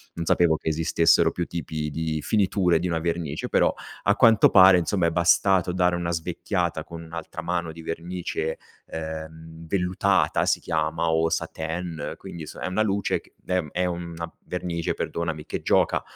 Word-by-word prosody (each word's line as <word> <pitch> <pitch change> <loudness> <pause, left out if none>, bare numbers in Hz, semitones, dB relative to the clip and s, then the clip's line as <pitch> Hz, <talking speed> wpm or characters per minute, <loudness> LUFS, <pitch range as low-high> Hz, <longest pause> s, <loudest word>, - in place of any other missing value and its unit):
Non 85 - -3
sapevo 80 -1 +3
che - - -10
esistessero 80 +1 +3
più 85 - -3
tipi 80 -3 -4
di 80 0 -2
finiture, 95 -5 +2
di 90 - -1
una 85 -1 0
vernice, 85 -3 -2
però, - - +3 0.3
a 100 - +3
quanto 115 -3 +6
pare, 95 -1 +8
insomma 90 +1 0
è 85 - +2
bastato 90 +2 +3
dare 90 -1 +2
una 85 -1 -2
svecchiata 85 0 -2
con 85 -1 -9
1 80 0 -14
altra 85 -1 -6
mano 85 -2 -2
di 80 +1 -10
vernice, 85 -1 -3 0.3
ehm, 80 0 -7
vellutata, 95 +1 +1
si - - +2
chiama, 80 +1 -1
o 80 0 +2
satin, 80 0 -4
quindi 80 -2 -8
s - - -8
è - - -4
una 100 +4 +1
luce 100 -1 0
c - - -24 0.2
ehm, 90 -5 0
è 90 - -1
una 85 -1 -5
vernice, 85 -2 -2
perdonami, 80 -3 -3
che - - -4
gioca - - +2
85 Hz, 170 wpm, -25 LUFS, 80-90 Hz, 0.3 s, pare